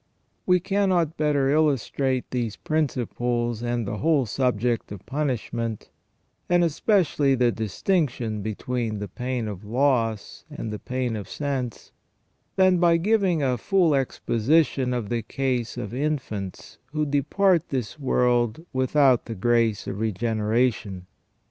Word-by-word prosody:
We 180 -1 +5
cannot 185 -4 +1
better 145 -3 +1
illustrate 135 -3 +1
these 120 -4 -2
principles, 120 -6 -1
and 120 -2 -2
the 105 - -3
whole 150 0 +2
subject 120 -1 0
of 100 -2 -9
punishment, 120 -5 -3 0.6
and 175 0 +4
especially 160 -4 +2
the 120 -1 +3
distinction 115 - -1
between 110 +1 -3
the 105 0 -4
pain 125 +3 -3
of 100 -2 -6
loss 115 -2 0
and 110 - -5
the 105 - -5
pain 130 -3 -2
of 105 -3 -6
sense, 135 -5 -4 0.6
than 185 -2 +4
by 170 -1 +4
giving 190 -4 +2
a 125 -3 +1
full 175 - +3
exposition 135 +1 +1
of 120 -5 -2
the 120 -1 -1
case 125 -2 -2
of 105 - -5
infants 130 -9 -4
who 155 0 0
depart 165 +5 +2
this 130 +1 -3
world 125 +1 +1
without 130 -1 +3
the 115 - -5
grace 115 0 +1
of 100 - -5
regeneration. 110 -2 0
125 Hz, 130 wpm, -25 LUFS, 115-150 Hz, 0.6 s, We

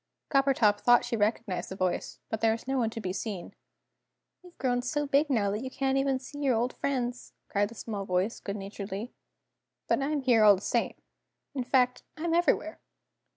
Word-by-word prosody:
Coppertop 265 -7 +3
thought 240 0 +5
she - - -1
recognised 205 -4 -1
the 190 - -6
voice, 185 -2 -2
but 220 - -3
there 225 0 +4
was 230 +2 -7
no 270 - 0
one 230 -2 +1
to 225 - -6
be 185 -4 -3
seen. 200 -3 -5 0.9
"You've 360 -1 -17
grown 245 -2 +1
so 295 +4 -1
big 285 +2 +2
now 210 -7 +2
that 210 +2 -2
you 260 - -4
can't 270 0 0
even 270 -1 +2
see 275 +3 -10
your 270 -4 +2
old 240 +3 0
friends," 245 -3 -3 0.2
continued 205 0 +1
the 235 - -12
small 205 -2 -5
voice, 185 +4 0
good 200 - -5
naturedly. 200 +3 -6 0.7
"But - - +2
I'm 290 +1 0
here 240 -4 +4
all 205 -1 +8
the - - -6
same - - 0 0.6
in 265 -3 -2
fact, 250 0 +2 0.2
I'm 330 +1 -1
everywhere. 335 -2 +1
240 Hz, 195 wpm, -29 LUFS, 205-270 Hz, 0.9 s, all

